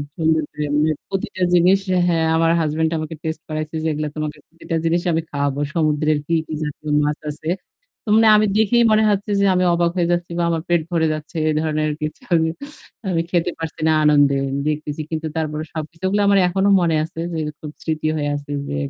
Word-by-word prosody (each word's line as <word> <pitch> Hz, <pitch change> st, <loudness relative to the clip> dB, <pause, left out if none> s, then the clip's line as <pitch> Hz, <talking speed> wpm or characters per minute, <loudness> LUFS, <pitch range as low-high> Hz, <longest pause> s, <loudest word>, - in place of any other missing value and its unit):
সুন্দর 160 Hz, -2 st, +2 dB
করে 150 Hz, 0 st, -3 dB, 0.2 s
মে 155 Hz, -, +2 dB, 0.2 s
প্রতিটা 190 Hz, -1 st, -4 dB
জিনিস 180 Hz, +3 st, +5 dB, 0.3 s
হ্যাঁ 165 Hz, -2 st, +2 dB
আমার 165 Hz, 0 st, +3 dB
হাসব্যান্ড 160 Hz, +1 st, 0 dB
আমাকে 155 Hz, +1 st, -5 dB
টেস্টে 160 Hz, -1 st, -4 dB
করাইছে 155 Hz, +1 st, -4 dB
যে -, -, 0 dB
এগুলো 150 Hz, 0 st, -2 dB
তোমাকে 155 Hz, -1 st, -4 dB
প্রতিটা 165 Hz, 0 st, -6 dB
জিনিস 170 Hz, +1 st, +2 dB
আমি 165 Hz, 0 st, +1 dB
খাওয়াবো। 145 Hz, -1 st, -1 dB
সমুদ্রের 155 Hz, -2 st, +1 dB
কি, 170 Hz, -, -1 dB
কি, 155 Hz, -, -6 dB
জাতীয় 150 Hz, +1 st, -6 dB, 0.2 s
মাছ 150 Hz, +1 st, -1 dB
আছে। 155 Hz, +2 st, -6 dB, 0.6 s
তো 215 Hz, -, -5 dB, 0.3 s
আমি 215 Hz, -, +3 dB
দেখেই 235 Hz, +2 st, +4 dB
মনে 215 Hz, 0 st, +4 dB
হচ্ছে 205 Hz, +1 st, -2 dB
যে 200 Hz, -, +3 dB
আমি 180 Hz, -, +2 dB
অবাক 170 Hz, 0 st, +2 dB
হয়ে 175 Hz, -1 st, +1 dB
যাচ্ছি 175 Hz, 0 st, -1 dB
বা -, -, +2 dB
আমার 165 Hz, -1 st, 0 dB
পেট 170 Hz, -2 st, +3 dB
ভরে 160 Hz, -2 st, +2 dB
যাচ্ছে। 155 Hz, +2 st, -7 dB
এ -, -, +3 dB
ধরনের 155 Hz, -1 st, 0 dB
কিছু। 155 Hz, -, -4 dB
আমি 160 Hz, -1 st, +3 dB, 0.6 s
আমি 165 Hz, -2 st, +1 dB
খেতে 175 Hz, -1 st, +1 dB
পারছি 160 Hz, 0 st, -6 dB
না 160 Hz, -, +4 dB
আনন্দে 145 Hz, -2 st, +4 dB, 0.3 s
দেখতেছি। 150 Hz, 0 st, -2 dB
কিন্তু 160 Hz, 0 st, -2 dB
তারপরে 155 Hz, -1 st, -2 dB
সবকিছুগুলো 170 Hz, +6 st, -2 dB
আমার 200 Hz, 0 st, +5 dB
এখনো 195 Hz, +3 st, +1 dB
মনে 165 Hz, -2 st, +2 dB
আছে 165 Hz, 0 st, -8 dB
যে -, -, -2 dB, 0.2 s
খুব 150 Hz, -, -7 dB
স্মৃতি 155 Hz, -1 st, -1 dB
হয়ে 145 Hz, -1 st, -1 dB
আছে 145 Hz, 0 st, -7 dB, 0.2 s
যে -, -, -3 dB
160 Hz, 195 wpm, -20 LUFS, 155-170 Hz, 0.6 s, জিনিস